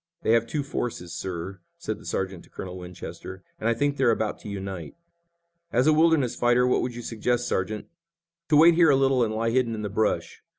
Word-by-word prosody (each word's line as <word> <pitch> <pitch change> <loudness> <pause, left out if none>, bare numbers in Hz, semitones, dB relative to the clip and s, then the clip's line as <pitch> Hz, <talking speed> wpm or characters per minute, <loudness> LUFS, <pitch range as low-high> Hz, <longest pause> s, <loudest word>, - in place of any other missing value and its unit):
"They - - +2
have 115 0 +3
two 145 +3 -2
forces, 115 -10 -4
sir," 95 +2 -5 0.2
said - - -4
the - - -12
sergeant 95 -2 -3
to - - -23
Colonel 90 -1 -7
Winchester, 90 +1 -9 0.2
"and 110 - 0
I 115 - +2
think 145 +3 0
they're 130 -3 +3
about 110 -2 0
to - - -9
unite." 95 -4 -6 0.8
"As 125 +2 +2
a 155 - +5
wilderness 155 -5 +3
fighter, 120 +1 +3
what 125 - +2
would 125 -1 -3
you 120 - -7
suggest, 120 +2 -1
Sergeant?" 105 +3 -2 0.6
"To 150 - +5
wait 165 +3 +8
here 165 -1 +5
a 140 - +6
little 135 -2 +3
and 110 - 0
lie 115 +1 0
hidden 120 -2 +1
in 105 - -5
the 105 - -2
brush. 110 +2 -1
115 Hz, 215 wpm, -26 LUFS, 95-130 Hz, 0.8 s, wait